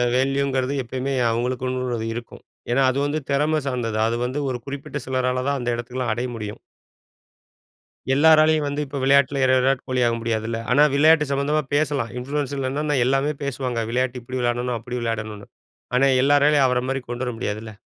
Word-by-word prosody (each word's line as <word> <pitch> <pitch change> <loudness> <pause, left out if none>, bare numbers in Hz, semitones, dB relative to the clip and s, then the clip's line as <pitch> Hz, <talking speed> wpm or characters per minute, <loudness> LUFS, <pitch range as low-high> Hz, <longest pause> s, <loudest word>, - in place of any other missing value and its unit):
வேல்யூங்கிறது 135 0 0
எப்பயுமே 130 +3 -3 0.2
அவுங்களுக்குன்னுள்ளது 125 0 -2
இருக்கும். 120 0 -8 0.3
ஏன்னா, 135 +3 +3
அது 135 - -2
வந்து 150 +2 -1
திறமை 150 +2 +2
சார்ந்தது. 120 -4 -2
அது 115 - -1
வந்து 130 +4 -3
ஒரு 125 - -2
குறிப்பிட்ட 140 +1 -6
சிலரால 130 0 -1
தான் 140 0 +1
அந்த 120 - -2
இடத்துக்குலாம் 120 0 -3
அடைய 125 +2 -2
முடியும். 105 -2 -6 1.5
எல்லாராலயும் 155 +1 +5
வந்து 145 +1 -2
இப்போ 140 +1 -6
விளையாட்டில 140 +1 +3 0.2
விராட் 130 +1 +1
கோலியாக 125 -2 +1
முடியாதுல்ல! 115 0 -2
ஆனா 145 +4 +6
விளையாட்டு 150 +1 +5
சம்மந்தமா 145 +2 +1
பேசலாம். 145 -6 0
இன்ஃப்ளூயன்ஸ்ல 140 0 -2
என்னான்னா, 150 +1 -1
எல்லாமே 135 +3 +1
பேசுவாங்க. 125 -4 -2
விளையாட்டு 125 0 -1
இப்படி 130 +2 -5
விளையாடணும் 120 0 -1
அப்படி 125 +2 -6
விளையாடணுனு. 105 -3 -4 0.5
ஆனா, 135 +2 +4 0.2
எல்லராலயும் 145 0 +4
அவரை 125 -1 0
மாரி 135 0 -1
கொண்டு 120 +1 -3
வர 125 - -3
முடியாதுல்ல! 110 -1 -4
130 Hz, 155 wpm, -22 LUFS, 120-140 Hz, 1.5 s, ஆனா